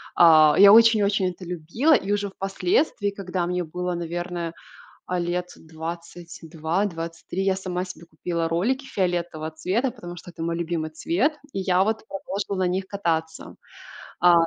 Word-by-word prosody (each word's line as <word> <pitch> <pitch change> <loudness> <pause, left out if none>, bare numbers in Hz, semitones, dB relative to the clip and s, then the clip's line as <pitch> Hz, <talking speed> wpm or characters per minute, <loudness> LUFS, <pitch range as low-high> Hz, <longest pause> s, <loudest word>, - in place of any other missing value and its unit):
а, 155 -3 +7
я 200 +1 +9
очень-очень 210 -4 +5
это 180 - -12
любила, 180 - +1
и 200 - +1
уже 205 0 -1
впоследствии, 195 - 0
когда 185 -3 -3
мне 180 0 -1
было, 180 +2 -3
наверное, 175 0 -4 0.5
а, 180 0 -2
лет 175 +1 -2
22-23, 165 +2 -4
я 195 -1 +2
сама 185 -1 -3
себе 180 -2 -10
купила 165 0 -3
ролики 240 +12 0
фиолетового 175 -7 -2
цвета, 200 - -1
потому 175 -7 -9
что 175 +1 -10
это 165 - -7
мой 170 0 -1
любимый 170 -2 -2
цвет. 180 - 0 0.2
И - - -2
я 185 -1 +3
вот 220 +1 -1
продолжила 195 -1 -3
на - - +2
них 185 +1 -1
кататься. 160 -5 -3 0.6
А, 175 0 +6
180 Hz, 150 wpm, -24 LUFS, 170-195 Hz, 0.6 s, я